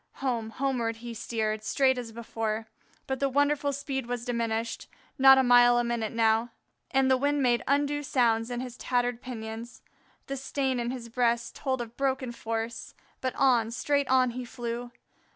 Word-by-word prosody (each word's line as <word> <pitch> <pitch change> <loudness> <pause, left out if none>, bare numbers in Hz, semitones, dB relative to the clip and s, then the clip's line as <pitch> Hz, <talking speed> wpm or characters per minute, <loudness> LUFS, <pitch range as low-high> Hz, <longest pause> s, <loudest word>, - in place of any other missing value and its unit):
Home, 240 -5 -2
homeward 240 -2 -1
he 235 +1 -8
steered 220 -1 -2
straight 260 +2 +2
as 235 -2 -6
before, 225 -1 -3 0.4
but 265 -1 -3
the 275 - +1
wonderful 285 +1 +2
speed 270 -2 -4
was 245 -1 -3
diminished; 230 -1 -2 0.3
not 265 0 +9
a 265 - +5
mile 245 -1 +6
a 240 - +2
minute 235 -2 -2
now; 225 0 +2 0.4
and 270 0 +3
the 260 0 +4
wind 285 +1 +1
made 240 -1 +3
undue 290 +1 +1
sounds 235 -4 +1
in 245 0 -3
his 250 -2 -7
tattered 245 -1 -1
pinions. 225 -1 -7 0.4
The 275 - -4
stain 265 -1 -1
in 240 0 -1
his 245 -2 -5
breast 235 0 0
told 260 -2 -2
of 235 0 -8
broken 265 -2 0
force; 225 0 -4 0.3
but 255 -1 -2
on, 240 -4 +3
straight 280 +3 0
on, 255 -1 +3
he 250 +1 -5
flew. 240 0 -5
245 Hz, 170 wpm, -28 LUFS, 230-265 Hz, 0.4 s, not